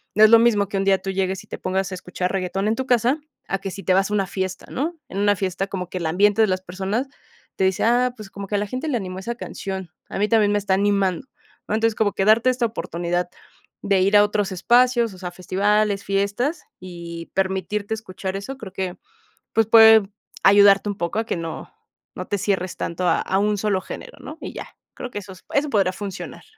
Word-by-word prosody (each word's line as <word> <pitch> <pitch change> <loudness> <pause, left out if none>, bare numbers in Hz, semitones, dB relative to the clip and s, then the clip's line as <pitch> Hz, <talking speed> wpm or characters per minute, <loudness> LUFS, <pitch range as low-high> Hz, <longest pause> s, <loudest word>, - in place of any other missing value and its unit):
no 215 - +6
es 215 - +9
lo 230 0 +8
mismo 220 -4 +3
que 200 - -2
un 195 - +1
día 195 -1 +4
tú 195 - -5
llegues 190 0 -2
y - - -21
te - - -7
pongas 190 +1 -2
a 185 - -3
escuchar 180 0 -3
reguetón 195 +1 -2
en 220 - +1
tu 260 +2 -3
casa, 245 +5 +2 0.3
a 195 - 0
que 195 -1 -5
si 195 - -8
te 185 - +2
vas 195 +2 +2
a - - -1
una 195 -2 +1
fiesta, 190 -1 -4
¿no?, 320 +6 -2
en 190 - -7
una 205 0 +3
fiesta 190 0 -2
como 180 -3 -5
que 185 - -5
el 170 - -4
ambiente 205 +6 +3
de 215 - +3
las 185 0 -1
personas 195 +8 -3 0.5
te - - -1
dice: 190 -1 +1
"Ah, 245 +2 +3
pues, 215 -4 -10
como 200 -1 -7
que 205 - -2
a - - +3
la 210 - -2
gente 255 +8 -4
le 265 - 0
animó 185 -2 -5
esa 235 +5 -4
canción, 190 -5 -6 0.2
a - - -4
mí 210 - +2
también 215 -3 +4
me 205 - +2
está 195 -1 0
animando", 200 +2 +1 0.4
¿no? 210 - 0
Entonces, 225 0 +1
como 210 -2 +1
que 195 - 0
darte 225 +4 +5
esta 250 -1 0
oportunidad 175 -4 -3 0.6
de 200 -1 +2
ir 200 +2 +3
a 205 - +7
otros 205 -1 0
espacios, 240 +3 +3
o - - -12
sea, 180 -1 -5
festivales, 200 +3 0
fiestas 200 - -1 0.2
y 170 -2 -8
permitirte 195 +2 -1
escuchar 190 -3 -5
eso, 265 +7 -7
creo 200 -7 -9
que, 185 -2 -4 0.6
pues, 225 -1 +3
puede 220 -1 +8 0.4
ayudarte 200 0 +6
un 205 - -4
poco 170 +5 -2
a 225 - -1
que - - -1
no 165 -1 -6 0.5
no - - -5
te 205 - -1
cierres 185 -2 -1
tanto 175 +2 -3
a - - +3
a 190 - 0
un 210 0 +1
solo 195 -2 0
género, - - -9
¿no?, 310 - -9
y - - -6
ya. - - -7 0.3
Creo 250 - -7
que 205 - -4
esos 190 -2 -12
eso 285 +1 +1
podrá 195 -5 +2
funcionar. 195 0 -7
200 Hz, 235 wpm, -22 LUFS, 190-220 Hz, 0.6 s, es